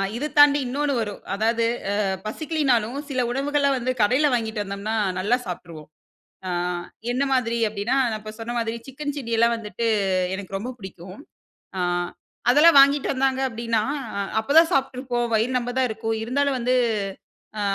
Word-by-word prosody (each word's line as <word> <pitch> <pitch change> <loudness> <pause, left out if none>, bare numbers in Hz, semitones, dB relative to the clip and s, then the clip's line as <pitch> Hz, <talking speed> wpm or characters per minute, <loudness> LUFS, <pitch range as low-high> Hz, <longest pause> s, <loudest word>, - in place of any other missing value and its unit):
இது 280 +6 -2
தாண்டி 290 0 +7
இன்னொன்னு 285 +3 -1
வரும். 205 -2 -5
அதாவது 225 +3 +1 0.3
அ - - 0 0.3
பசிக்கலனாலும் 265 -2 0
சில 260 -2 0
உணவுகள 280 +2 +1
வந்து 255 +1 -1
கடையில 255 +8 +4
வாங்கிக்கிட்டு 220 -3 -1
வந்தோம்னா, 200 +2 -4 0.2
நல்லா 210 +6 +2
சாப்பிட்டுருவோம். 165 -4 -8 0.6
ஆ - - -2 0.6
என்ன 255 +3 0
மாதிரி 235 -2 +1
அப்பிடின்னா 215 +4 -1 0.2
நான் 215 0 -6
சொன்ன 235 +1 -4
மாதிரி 225 0 -2
சிக்கன் 290 +2 -5
சில்லிலாம் 235 -2 +1
வந்துட்டு 225 +1 -3 0.5
எனக்கு 195 0 -5
ரொம்ப 235 +6 -5
பிடிக்கும். 190 -1 -10 0.6
ஆ - - -1 0.7
அதெல்லாம் 295 +3 +7
வாங்கிக்கிட்டு 280 0 +4
வந்தாங்க 265 0 +1
அப்பிடின்னா, 230 -2 -1 0.4
அ - - 0 0.2
அப்பதான் 320 +9 +5
சாப்பிட்டுருப்போம். 255 -2 -1
வயிறு 235 +4 +1
நெம்ப 245 0 -4
தான் 260 -1 +2
இருக்கும் 225 0 -2
இருந்தாலும் 275 +3 0
வந்து 250 +1 +1 0.8
அ - - -1
240 Hz, 145 wpm, -23 LUFS, 220-270 Hz, 0.8 s, தாண்டி